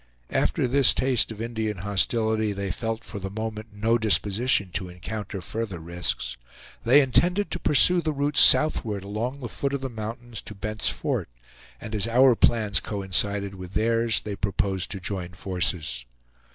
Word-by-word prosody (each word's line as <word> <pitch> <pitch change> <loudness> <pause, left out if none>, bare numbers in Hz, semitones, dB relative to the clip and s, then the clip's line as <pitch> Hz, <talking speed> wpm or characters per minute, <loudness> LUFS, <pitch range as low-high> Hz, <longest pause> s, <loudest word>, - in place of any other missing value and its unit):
After - - +1
this 135 +2 +3
taste 130 -3 +2
of 110 - -9
Indian 110 -3 -3
hostility 110 +3 0
they 100 -1 -3
felt 115 +1 -3
for 100 - -7
the 95 0 -5
moment 110 +1 -5
no 110 +3 +1
disposition 105 -1 +1
to 90 +2 -3
encounter 100 +2 -6
further 110 0 -4
risks. 80 -7 -3 0.5
They 135 +5 +6
intended 175 +9 +2
to 180 - -2
pursue 175 +4 +4
the 155 -1 -1
route 145 0 -1
southward 110 -11 +5
along 115 +7 -4
the 120 - -4
foot 140 +3 -3
of 140 - -2
the 135 -1 -4
mountains 115 +1 -6
to 105 - -9
Bent's 105 +2 -1
Fort; - - -2 0.5
and 110 - -8
as 105 0 +1
our 125 +2 +5
plans 110 -4 +3
coincided 100 0 -1
with 90 -1 -10
theirs, 115 0 +1
they 105 -1 -5
proposed 95 -2 -1
to 100 - -4
join 90 -1 -5
forces. 85 -9 -1
110 Hz, 165 wpm, -25 LUFS, 95-120 Hz, 0.5 s, They